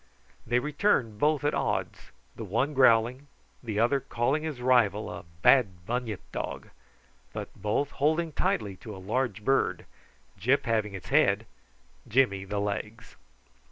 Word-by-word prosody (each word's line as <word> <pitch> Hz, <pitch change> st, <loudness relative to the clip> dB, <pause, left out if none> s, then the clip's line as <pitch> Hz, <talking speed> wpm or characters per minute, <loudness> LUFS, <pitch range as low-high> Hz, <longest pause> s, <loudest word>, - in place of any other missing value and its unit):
They 120 Hz, -, +2 dB
returned 135 Hz, -, +1 dB
both 150 Hz, -1 st, +2 dB
at 145 Hz, -, +1 dB
odds, -, -, -2 dB, 0.2 s
the 115 Hz, -, -6 dB
one 115 Hz, +9 st, 0 dB
growling, 125 Hz, +1 st, +3 dB, 0.3 s
the 110 Hz, -4 st, -4 dB
other 120 Hz, +5 st, +3 dB
calling 135 Hz, +4 st, -1 dB
his 155 Hz, -5 st, -5 dB
rival 120 Hz, -5 st, +2 dB
a -, -, -8 dB, 0.2 s
bad 95 Hz, -10 st, +4 dB
bunyip 115 Hz, -3 st, -3 dB
dog, -, -, -5 dB, 0.6 s
but -, -, -6 dB
both 120 Hz, +7 st, -1 dB
holding 160 Hz, +3 st, +1 dB
tightly 105 Hz, -8 st, -1 dB
by 110 Hz, -, -7 dB
a -, -, -9 dB
large 105 Hz, +2 st, -2 dB
bird, 135 Hz, 0 st, +1 dB, 0.5 s
Gyp 135 Hz, +4 st, +2 dB
having 110 Hz, -4 st, -1 dB
its 95 Hz, -, -9 dB
head, -, -, +3 dB, 0.6 s
Jimmy 100 Hz, -6 st, +2 dB
the 105 Hz, +1 st, -4 dB
legs. 105 Hz, +2 st, -4 dB
120 Hz, 140 wpm, -28 LUFS, 105-140 Hz, 0.6 s, bad